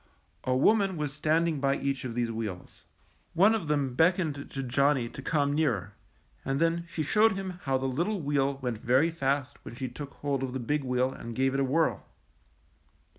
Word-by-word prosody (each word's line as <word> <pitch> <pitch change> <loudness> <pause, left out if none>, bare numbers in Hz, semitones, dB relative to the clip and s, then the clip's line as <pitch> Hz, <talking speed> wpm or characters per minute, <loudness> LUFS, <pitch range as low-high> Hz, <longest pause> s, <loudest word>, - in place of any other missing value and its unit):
A 130 - +1
woman 195 +6 +3
was 150 -2 -3
standing 155 +1 +1
by 140 0 +1
each 135 -1 -2
of 120 -2 -5
these 120 -1 0
wheels. 110 -5 -6 0.5
One 200 +6 +6
of 205 -8 -2
them 145 -4 0
beckoned 165 +2 +3 0.2
to 135 - -4
Johnny 135 0 +2
to 135 - -9
come 145 -1 +1
nearer, 140 - 0 0.5
and 135 0 -1
then 165 +1 +1
she 160 -2 -2
showed 215 +8 +4
him 190 -2 -5
how 135 -1 +2
the 130 - -3
little 170 +11 -1
wheel 140 -2 0
went 120 -4 -2
very 130 +9 +3
fast 140 -3 -2
when - - -9
she 130 0 -4
took 140 +3 -8
hold 140 -2 -2
of 130 -1 -3
the 130 - -2
big 145 +4 -1
wheel 125 0 +1
and 115 0 -8
gave 135 +1 +1
it 135 - 0
a - - +3
whirl. 155 +5 +1
140 Hz, 195 wpm, -29 LUFS, 130-160 Hz, 0.5 s, One